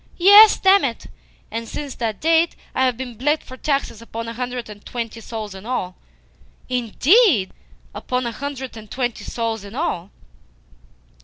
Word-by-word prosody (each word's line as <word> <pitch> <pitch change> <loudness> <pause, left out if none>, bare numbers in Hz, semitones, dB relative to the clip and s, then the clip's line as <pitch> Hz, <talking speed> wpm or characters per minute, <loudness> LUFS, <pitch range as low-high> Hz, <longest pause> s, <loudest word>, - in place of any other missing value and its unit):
"Yes, 405 +4 +8
damn 385 +1 +5
it! 235 -4 -3 0.5
And 230 0 -4
since 285 +1 -6
that 225 -3 -3
date 330 +1 +3 0.2
I 260 - +2
have 250 -3 0
been 255 -1 -6
bled 295 +4 +1
for 255 - -11
taxes 275 -5 -2
upon 230 0 -6
a 230 - -5
hundred 245 0 -4
and 210 -1 -12
twenty 230 -1 -5
souls 220 -3 -6
in 190 0 -10
all." 215 -6 -3 0.7
"Indeed? 250 - +3 0.4
Upon 250 0 -2
a 235 - -2
hundred 265 0 -6
and 215 -1 -11
twenty 245 -1 -3
souls 225 -3 -3
in 205 +3 -10
all!" 200 - -2
245 Hz, 160 wpm, -21 LUFS, 225-280 Hz, 0.7 s, Yes